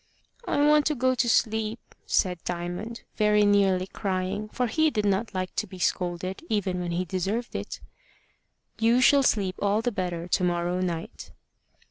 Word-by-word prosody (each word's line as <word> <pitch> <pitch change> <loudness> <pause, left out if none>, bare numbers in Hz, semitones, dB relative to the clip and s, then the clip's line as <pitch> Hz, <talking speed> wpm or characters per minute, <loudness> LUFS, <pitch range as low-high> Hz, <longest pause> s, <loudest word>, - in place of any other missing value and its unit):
"I - - 0
want 300 0 +4
to 300 - +1
go 255 0 +2
to 240 -1 +1
sleep," 220 0 0
said 180 -3 +1
Diamond, 175 +6 -5
very 210 -1 +4
nearly 195 -2 +3
crying, 195 +1 -3
for 250 - -1
he 315 +7 +2
did 210 -7 -1
not 200 +2 0
like 185 -1 -3
to - - -1
be 185 - -10
scolded, 180 +1 -2
even 195 -4 0
when 175 -1 -3
he 180 +2 -1
deserved 195 +7 -3
it. - - -5 1.0
"You 230 +2 +4
shall 280 +2 +6
sleep 200 -7 +1
all 205 +2 +1
the 245 - 0
better 175 -4 -3
to 180 - +1
morrow 175 0 0
night." 170 -3 -4
200 Hz, 165 wpm, -26 LUFS, 180-225 Hz, 1.0 s, shall